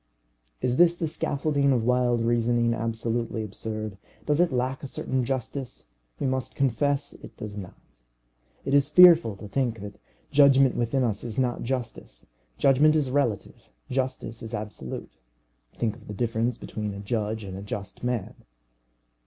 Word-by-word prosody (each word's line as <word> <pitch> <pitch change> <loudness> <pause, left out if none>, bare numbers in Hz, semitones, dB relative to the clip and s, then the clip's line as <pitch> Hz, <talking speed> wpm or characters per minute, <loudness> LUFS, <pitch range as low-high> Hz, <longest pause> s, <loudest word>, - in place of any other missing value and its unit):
Is 125 +1 +1
this 170 0 +5 0.2
scaffolding 140 -2 +1
of 120 -4 +2
wild 125 -1 +2
reasoning 120 0 +2
absolutely 115 0 -2
absurd? 110 -1 -5 0.3
does 150 0 +1
it 175 -2 +3
lack 130 +1 -1
a 140 - -6
certain 130 -1 -2
justice? 130 - -4 0.3
We - - -1
must 130 -2 -2
confess 140 +2 0
it - - -13
does 105 -1 -7
not. 95 -4 -8 0.9
It 135 - -1
is 140 0 +4
fearful 165 - +7
to 105 +2 -9
think 120 +1 -1
that 105 0 -9 0.3
judgment 135 -2 +6
within 125 +3 +1
us 110 -4 -1
is 115 -2 -6
not 125 -2 0
justice. 120 - -5 0.3
Judgment 150 +3 +5
is 150 -2 +2
the - - -5
relative, 130 -7 -1 0.2
justice 130 -3 -2
is 115 -2 -7
the - - 0
absolute. 105 -12 -7 0.6
Think 110 -3 -1
of 110 - -17
the 105 - -6
difference 115 +1 0
between 105 -2 -5
a - - -7
judge 110 +1 -2
and 95 -2 -7
a 95 - -6
just 100 0 -7
man. 125 -5 -2
120 Hz, 160 wpm, -26 LUFS, 110-135 Hz, 0.9 s, fearful